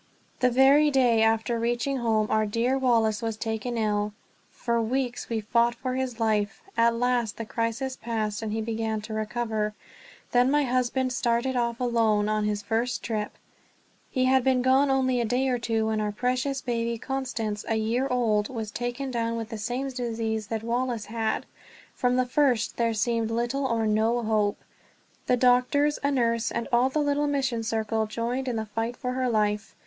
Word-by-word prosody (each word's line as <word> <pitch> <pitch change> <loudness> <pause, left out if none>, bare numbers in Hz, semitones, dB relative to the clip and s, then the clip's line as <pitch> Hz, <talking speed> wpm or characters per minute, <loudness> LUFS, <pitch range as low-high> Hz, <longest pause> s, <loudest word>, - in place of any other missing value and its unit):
The 250 - +4
very 270 +4 +5
day 250 -5 +3
after 225 +1 +2
reaching 240 +4 0
home 225 -3 +1
our 215 0 +2
dear 235 +5 +1
Wallace 230 -5 +2
was 225 -2 -3
taken 225 +2 -3
ill. 210 -1 0 0.4
For 235 -1 -1
weeks 245 +1 -2
we 225 -2 -1
fought 235 +2 +2
for 255 +1 -3
his 255 -2 -3
life; 215 -2 0
at 230 0 +3
last 240 -2 0
the 230 - -4
crisis 230 +4 -2
passed 220 -2 -2
and 220 -1 -3
he 220 +1 -1
began 220 -1 -2
to 220 +1 -7
recover. 215 -1 -2 0.6
Then 245 +1 +4
my 295 +1 +3
husband 255 0 0
started 245 +1 0
off 235 -1 0
alone 225 -4 +2
on 215 0 0
his 210 0 -1
first 235 +2 -1
trip! 215 -2 -3 0.8
He 255 -2 +1
had 260 0 +4
been 260 -1 +2
gone 265 +2 +4
only 260 -2 +2
a - - 0
day 250 +4 +1
or 250 -1 0
two 225 -1 0
when 220 -1 0
our 210 -1 -1
precious 255 +4 -1
baby 235 -2 -1
Constance, 230 -5 -3
a 225 - +1
year 230 +4 0
old, 220 -4 +1
was 225 -4 -5
taken 245 +4 -3
down 230 -1 -1
with 225 -1 -5
the 225 - -5
same 250 +6 -2
disease 225 -4 -3
that 220 0 -3
Wallace 235 -1 -1
had. 225 0 -2 0.5
From 250 -1 +1
the 255 0 +2
first 250 -3 +1
there 230 -1 +1
seemed 230 +1 0
little 240 +4 -1
or 230 -2 0
no 220 +3 +1
hope. 215 -2 +1 0.7
The 250 - +3
doctors, 255 +4 +3
a 280 - +2
nurse, 230 -4 +1
and 235 - -3
all 245 +2 +4
the 270 - -3
little 290 0 +1
mission 265 -5 0
circle 220 -1 -1
joined 235 +4 -3
in 245 - -1
the 220 0 -2
fight 225 +3 -3
for 250 - -3
her 255 0 0
life. 210 -2 0
235 Hz, 185 wpm, -26 LUFS, 220-255 Hz, 0.8 s, very